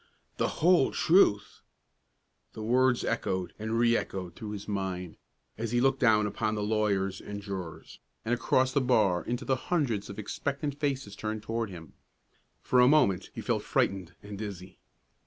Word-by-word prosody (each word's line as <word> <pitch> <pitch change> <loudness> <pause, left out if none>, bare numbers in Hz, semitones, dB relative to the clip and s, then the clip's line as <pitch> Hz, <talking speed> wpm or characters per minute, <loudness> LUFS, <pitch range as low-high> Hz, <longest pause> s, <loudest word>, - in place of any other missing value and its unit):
The - - -2
whole 175 -5 +5
truth! 160 - +3 0.9
The 110 - -7
words 125 +2 +2
echoed 95 -5 -2
and 110 +1 -2
re 120 0 +4
echoed 90 -5 -3
through 110 - -7
his 100 -1 -7
mind, 95 -4 -3 0.4
as 115 0 -3
he 120 - +3
looked 135 +1 +2
down 110 -4 +4
upon 105 +1 -1
the 105 - -2
lawyers 100 -3 0
and 105 0 -6
jurors, 95 -5 -7 0.3
and 115 - 0
across 130 +1 +2
the 140 - +3
bar 110 -8 +2
into 125 +2 -3
the 135 - +2
hundreds 120 - 0
of 100 - -8
expectant 140 +7 -3
faces 135 -8 -2
turned 110 0 -4
toward 115 0 -2
him. 85 -4 -11 0.7
For 125 - +3
a 125 - +7
moment 100 -11 +3
he - - -5
felt - - 0
frightened 95 -3 -1
and 100 -1 -8
dizzy. 100 -4 -7
110 Hz, 165 wpm, -29 LUFS, 100-125 Hz, 0.9 s, a